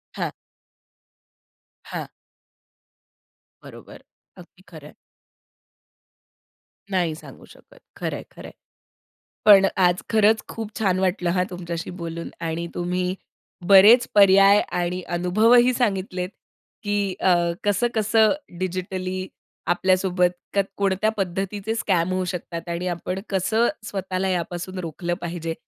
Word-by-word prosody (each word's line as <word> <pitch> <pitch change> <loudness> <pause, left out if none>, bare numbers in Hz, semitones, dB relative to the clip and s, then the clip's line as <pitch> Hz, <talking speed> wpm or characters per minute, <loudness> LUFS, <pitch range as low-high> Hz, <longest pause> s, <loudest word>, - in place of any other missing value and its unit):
हां. - - -3 1.6
हां. - - -4 1.6
बरोबर. - - -13 0.3
अगदी - - -16
खरं - - -12
आहे. - - -16 2.0
नाही 175 -4 0
सांगू - - -13
शकत. - - -19 0.2
खरंय, - - -4
खरंय. - - -11 0.9
पण 200 -2 +8
आज 180 -1 +3
खरंच 220 0 +3
खूप 225 -2 -6
छान 185 -4 +1
वाटलं 180 -1 0
हां 180 - +2
तुमच्याशी 170 -2 -6
बोलून 170 0 -5 0.2
आणि 165 +1 -3
तुम्ही 180 +1 -2 0.5
बरेचं 210 +5 +7
पर्याय 195 0 +7
आणि 180 +1 -2 0.2
अनुभवही 230 +8 +4
सांगितलेत, 190 -6 -1 0.5
की 205 -2 -1
अ, 185 - +4 0.3
कसं-कसं 220 +1 +2 0.3
डिजिटली 185 0 -3 0.4
आपल्यासोबत 185 0 +2 0.2
क 200 - +1 0.2
कोणत्या 200 +1 +1
पद्धतीचे 195 +3 -3
स्कॅम 185 -5 0
होऊ 185 0 -1
शकतात? 175 -1 -6
आणि 170 +2 -3
आपण 180 +2 -3
कसं 220 +5 +1 0.2
स्वतःला 190 -2 -3
यापासून 180 +1 -3
रोखलं 170 +1 -4
पाहिजे. 165 -1 -4
185 Hz, 105 wpm, -23 LUFS, 180-205 Hz, 2.0 s, पण